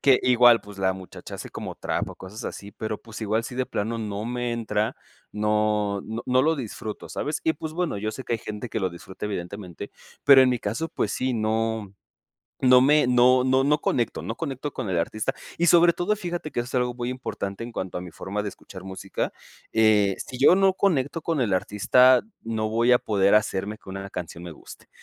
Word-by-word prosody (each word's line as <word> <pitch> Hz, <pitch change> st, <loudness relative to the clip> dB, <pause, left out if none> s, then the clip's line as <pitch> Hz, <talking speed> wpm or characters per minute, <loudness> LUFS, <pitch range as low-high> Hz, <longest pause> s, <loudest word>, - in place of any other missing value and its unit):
que 135 Hz, -2 st, +5 dB
igual 120 Hz, -2 st, +6 dB
pues, 100 Hz, -1 st, -12 dB
la 95 Hz, -1 st, +2 dB
muchacha 95 Hz, -2 st, -10 dB
hace -, -, -8 dB
como -, -, -6 dB
trap -, -, -2 dB
o -, -, -9 dB
cosas 105 Hz, +5 st, -9 dB
así, 100 Hz, -, -6 dB
pero, 110 Hz, +1 st, -4 dB
pues 110 Hz, -1 st, -10 dB
igual 110 Hz, +1 st, 0 dB
sí 125 Hz, -, -7 dB
de 130 Hz, 0 st, 0 dB
plano 115 Hz, +3 st, -2 dB
no 105 Hz, -1 st, -4 dB
me 120 Hz, 0 st, -2 dB
entra, 110 Hz, 0 st, -1 dB, 0.4 s
no 105 Hz, -1 st, +1 dB
no 110 Hz, +2 st, -4 dB
no 130 Hz, 0 st, +3 dB
lo 160 Hz, +3 st, +3 dB
disfruto, 110 Hz, -4 st, -6 dB
¿sabes?, 150 Hz, +2 st, -3 dB
y 160 Hz, -, +2 dB
pues, 155 Hz, +1 st, -6 dB
bueno, 175 Hz, -6 st, -1 dB
yo 110 Hz, +1 st, -3 dB
sé 130 Hz, -, -7 dB
que 120 Hz, -, -1 dB
hay -, -, -2 dB
gente 105 Hz, +2 st, -6 dB
que 110 Hz, -, -2 dB
lo 95 Hz, -2 st, 0 dB
disfruta 95 Hz, +4 st, -8 dB
evidentemente, 90 Hz, -2 st, -6 dB, 0.3 s
pero 140 Hz, -2 st, +9 dB
en 130 Hz, -1 st, +5 dB
mi 125 Hz, -2 st, -1 dB
caso, 115 Hz, +11 st, -2 dB
pues -, -, -2 dB
sí, 130 Hz, -1 st, -1 dB
no 110 Hz, -2 st, -1 dB, 0.7 s
no 125 Hz, -1 st, +7 dB
me 145 Hz, +2 st, +5 dB
no 125 Hz, +1 st, +5 dB
no 130 Hz, +1 st, +3 dB
no 150 Hz, +2 st, +3 dB
conecto 120 Hz, -2 st, 0 dB
no 115 Hz, -, -4 dB
conecto 140 Hz, 0 st, -4 dB
con 120 Hz, -, -4 dB
el 90 Hz, -2 st, 0 dB
artista, 110 Hz, +10 st, -1 dB, 0.2 s
y 170 Hz, -, +2 dB
sobre 175 Hz, 0 st, +6 dB
todo 185 Hz, +5 st, 0 dB
fíjate 175 Hz, -5 st, -4 dB
que 120 Hz, -, -1 dB
eso 120 Hz, -, -4 dB
es 125 Hz, -, -10 dB
algo 125 Hz, -1 st, +1 dB
muy 120 Hz, 0 st, -3 dB
importante 110 Hz, -5 st, -5 dB
en 120 Hz, -, -7 dB
cuanto 95 Hz, -5 st, -4 dB
a -, -, -6 dB
mi 90 Hz, -1 st, -8 dB
forma 100 Hz, +5 st, -4 dB
de 105 Hz, -, -3 dB
escuchar 95 Hz, -1 st, -11 dB
música. 95 Hz, +1 st, -4 dB, 0.4 s
Eh, 105 Hz, -3 st, +4 dB
si 125 Hz, -, -8 dB
yo 140 Hz, +6 st, +7 dB
no 195 Hz, 0 st, +4 dB
conecto 165 Hz, -6 st, 0 dB
con 160 Hz, -4 st, 0 dB
el 110 Hz, -5 st, 0 dB
artista, 125 Hz, +7 st, +4 dB, 0.2 s
no 110 Hz, -1 st, -2 dB
voy 115 Hz, +3 st, +3 dB
a 125 Hz, -, +6 dB
poder 100 Hz, -1 st, +2 dB
hacer 105 Hz, -1 st, +1 dB
que 95 Hz, -, -13 dB
una 95 Hz, +1 st, -6 dB
canción 85 Hz, -2 st, -7 dB
me 85 Hz, -1 st, -7 dB
guste. -, -, -14 dB
115 Hz, 220 wpm, -25 LUFS, 105-130 Hz, 0.7 s, pero